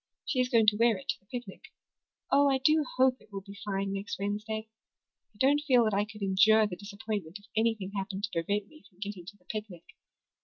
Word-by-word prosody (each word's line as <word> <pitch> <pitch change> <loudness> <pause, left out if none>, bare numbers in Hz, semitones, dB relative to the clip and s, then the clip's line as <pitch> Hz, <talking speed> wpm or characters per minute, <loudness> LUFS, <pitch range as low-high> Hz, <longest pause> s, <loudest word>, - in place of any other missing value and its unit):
She 255 - -1
is 250 0 +2
going 230 -4 +4
to 210 -1 +4
wear 230 -2 +4
it 185 - -13
to - - 0
the 195 - -36
picnic. 240 -4 -7 0.7
Oh, 280 0 +5
I 270 - +3
do 305 +4 +4
hope 260 0 +4
it - - -22
will 195 -1 -5
be 200 0 -11
fine 195 -1 -2
next 195 +1 -4
Wednesday. 210 +2 -3 0.6
I 205 - -24
don't 280 +5 +4
feel 250 -4 +6
that 215 -2 +1
I 200 +1 +2
could 210 -1 -9
endure 215 +3 +5
the 195 -4 -4
disappointment 200 -3 -5
if 205 - -19
anything 220 -3 +1
happened 195 0 -3
to 215 - -2
prevent 200 +5 -1
me 310 +4 -18
from 180 - -30
getting 200 -3 -6
to 205 +1 -10
the 180 - -32
picnic. 205 -4 -6
210 Hz, 225 wpm, -30 LUFS, 195-230 Hz, 0.7 s, feel